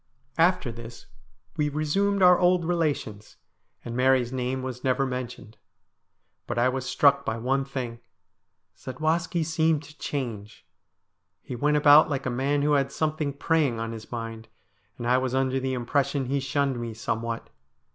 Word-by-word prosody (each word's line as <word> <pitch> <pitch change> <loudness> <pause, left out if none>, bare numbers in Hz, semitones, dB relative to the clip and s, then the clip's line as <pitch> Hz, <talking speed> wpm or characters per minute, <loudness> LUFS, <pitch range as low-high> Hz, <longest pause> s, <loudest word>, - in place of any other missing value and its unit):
After 175 -6 +3
this 115 0 -10 0.5
we 150 -1 +1
resumed 190 +7 +1
our 180 -1 +7
old 180 -1 +3
relations, 150 -11 -2 0.5
and 120 -1 -5
Mary's 130 -1 +2
name 130 0 -2
was 125 -1 -6
never 135 +1 +1
mentioned. 125 -4 -6 0.9
But - - -3
I 120 +2 +3
was 130 0 -3
struck 140 +1 +4
by 110 -4 -2
one 135 +4 0
thing. 125 -4 -5 0.8
Zadwaski 160 +6 -1
seemed 160 -1 +1
to 145 +1 -14
change. 115 -7 -5 0.8
He 125 - -6
went 150 +4 +2
about 150 +1 +7
like 140 -3 -2
a 130 - -1
man 140 +3 0
who 150 - +2
had 135 -1 +1
something 155 -1 -1
preying 145 -4 +1
on 115 0 -3
his 110 -1 -9
mind, 115 -1 -6 0.5
and 120 - -6
I 125 +2 +3
was 130 0 -2
under 135 0 +1
the 130 0 -2
impression 135 +2 0
he 140 +3 0
shunned 135 -1 -1
me 115 -2 -5
somewhat. 115 +1 -4
135 Hz, 155 wpm, -26 LUFS, 120-150 Hz, 0.9 s, our